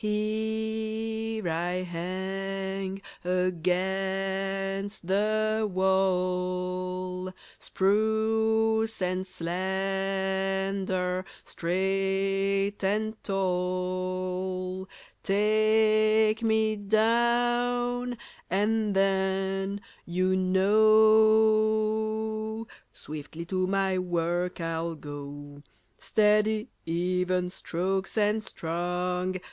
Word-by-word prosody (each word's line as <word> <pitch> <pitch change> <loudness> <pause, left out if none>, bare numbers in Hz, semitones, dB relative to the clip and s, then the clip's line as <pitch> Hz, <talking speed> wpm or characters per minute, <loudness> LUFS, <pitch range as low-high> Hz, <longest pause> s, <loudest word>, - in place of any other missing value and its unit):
Here 220 0 -2
I 175 +2 -1
hang 190 +2 -4 0.2
against 190 +2 -1
the 215 +3 +1
wall, 185 -1 0 0.3
Spruce 220 +2 +1
and 185 0 -1
slender, 190 +1 -1 0.2
straight 195 +2 0
and 215 +3 -1
tall. 185 0 -2 0.3
Take 215 +1 +3
me 220 -1 +2
down, 240 +3 +1 0.3
and 210 +2 +1
then, 195 0 0 0.3
you 185 +2 +1
know, 220 +2 +3 0.3
Swiftly 155 +2 -8
to 185 +1 -1
my 190 -1 +1
work 175 0 -1
I'll 165 0 -2
go. 145 -1 -9 0.4
Steady, 215 0 +2 0.2
even 180 +1 0
strokes 190 +3 -2
and 215 +1 +2
strong! 180 +1 -2
195 Hz, 60 wpm, -28 LUFS, 185-215 Hz, 0.4 s, Take